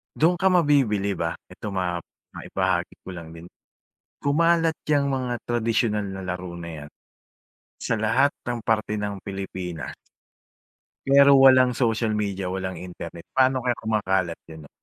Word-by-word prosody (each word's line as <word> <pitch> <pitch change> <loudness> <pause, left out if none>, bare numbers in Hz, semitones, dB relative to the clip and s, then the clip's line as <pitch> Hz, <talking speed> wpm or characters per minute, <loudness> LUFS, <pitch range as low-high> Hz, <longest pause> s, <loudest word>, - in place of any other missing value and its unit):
Do'n 170 +3 +3
ka 190 - -2
mabibilib, 135 - +2
ah, 85 - -1 0.2
ito 105 -2 -7
map 90 -2 -2 0.3
maibahagi - - -1
ko - - -11
lang 80 -1 -9
din. 85 +1 -11 0.7
Kumalat 165 +2 +2
'yang 145 -2 +2
mga 125 -3 -2
tradisyonal 115 -2 0
na 95 -1 -6
laro 90 -1 -5
na 85 -3 -7
'yan, - - -13 0.9
sa 110 - -2
lahat 125 +6 +3 0.2
ng 120 -2 -3
parte 110 -1 0
ng 105 -1 -4
Pilipinas 95 -4 -6 1.1
pero 140 0 +7
walang 130 -2 +6
social 115 -2 +1
media, 100 -3 -2
walang 95 0 -4
internet, 85 -2 -9
paano 130 0 +4
kaya 125 -1 0
kumakalat 95 -6 -1
'yon, 80 -1 -11
'no? 70 - -15
105 Hz, 140 wpm, -24 LUFS, 90-130 Hz, 1.1 s, pero